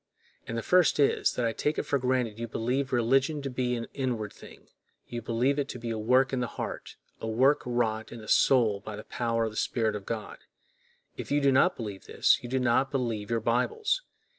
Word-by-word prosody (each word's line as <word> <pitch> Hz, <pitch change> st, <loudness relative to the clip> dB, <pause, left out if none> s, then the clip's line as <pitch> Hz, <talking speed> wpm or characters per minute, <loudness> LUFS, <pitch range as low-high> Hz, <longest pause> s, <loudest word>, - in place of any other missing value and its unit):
And 115 Hz, -, -3 dB
the 115 Hz, -, -3 dB
first 180 Hz, -4 st, +4 dB
is, 140 Hz, -, +3 dB
that 125 Hz, -, -1 dB
I 115 Hz, -, 0 dB
take 150 Hz, +6 st, -1 dB
it -, -, 0 dB
for 140 Hz, -, 0 dB
granted 125 Hz, -4 st, 0 dB
you 115 Hz, -, -3 dB
believe 125 Hz, +5 st, -1 dB
religion 135 Hz, +5 st, +2 dB
to 135 Hz, -, -3 dB
be 125 Hz, -1 st, -1 dB
an 115 Hz, -1 st, -4 dB
inward 120 Hz, -6 st, -2 dB
thing; -, -, -15 dB, 0.4 s
you 120 Hz, -1 st, -6 dB
believe 125 Hz, +5 st, 0 dB
it 140 Hz, -, -2 dB
to -, -, -5 dB
be 115 Hz, -1 st, -5 dB
a 110 Hz, -, -3 dB
work 130 Hz, +5 st, +3 dB
in 130 Hz, -, 0 dB
the 125 Hz, -, -1 dB
heart, -, -, -6 dB, 0.2 s
a 110 Hz, -, -5 dB
work 130 Hz, +6 st, +3 dB
wrought 110 Hz, -2 st, -1 dB
in 120 Hz, -, -8 dB
the 110 Hz, -, -11 dB
soul 115 Hz, -7 st, +4 dB
by 105 Hz, 0 st, -7 dB
the 105 Hz, -, -8 dB
power 115 Hz, -1 st, -1 dB
of 110 Hz, -, -1 dB
the 110 Hz, -, -10 dB
Spirit 110 Hz, -3 st, 0 dB
of 100 Hz, -2 st, -7 dB
God. 110 Hz, -2 st, -5 dB, 0.8 s
If -, -, -6 dB
you 145 Hz, -, +2 dB
do 140 Hz, -1 st, +3 dB
not 140 Hz, +7 st, +3 dB
believe 105 Hz, -5 st, -6 dB
this, -, -, +3 dB
you 120 Hz, -, -7 dB
do 130 Hz, -, 0 dB
not 125 Hz, +2 st, +2 dB
believe 115 Hz, -6 st, -2 dB
your 115 Hz, -1 st, 0 dB
Bibles. 275 Hz, -, 0 dB
120 Hz, 225 wpm, -28 LUFS, 115-135 Hz, 0.8 s, first